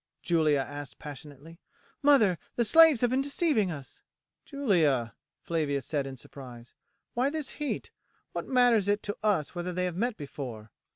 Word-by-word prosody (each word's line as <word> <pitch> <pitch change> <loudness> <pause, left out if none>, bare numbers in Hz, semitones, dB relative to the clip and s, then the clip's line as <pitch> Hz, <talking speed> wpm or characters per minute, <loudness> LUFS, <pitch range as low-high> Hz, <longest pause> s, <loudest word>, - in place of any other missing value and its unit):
Julia 155 -5 +2
asked 145 0 -8
passionately. 150 +2 -11 0.4
"Mother, 240 - +4 0.2
the 235 - +2
slaves 320 +1 +7
have 245 -1 +2
been 260 +1 +2
deceiving 280 - +1
us." 145 -6 -9 0.4
"Julia," 165 - +1 0.3
Flavia 150 -4 -1
said 140 0 -2
in 135 -1 -8
surprise, 120 -2 -11 0.4
"why 250 +3 +1
this 305 -2 -3
heat? 295 - -3 0.4
What - - -5
matters 245 -6 +4
it 205 0 +1
to 205 - -4
us 205 -9 0
whether 175 0 -4
they 180 +1 -1
have 180 -2 -3
met 230 +4 -1
before?" 125 -7 -8
175 Hz, 155 wpm, -28 LUFS, -, 0.4 s, slaves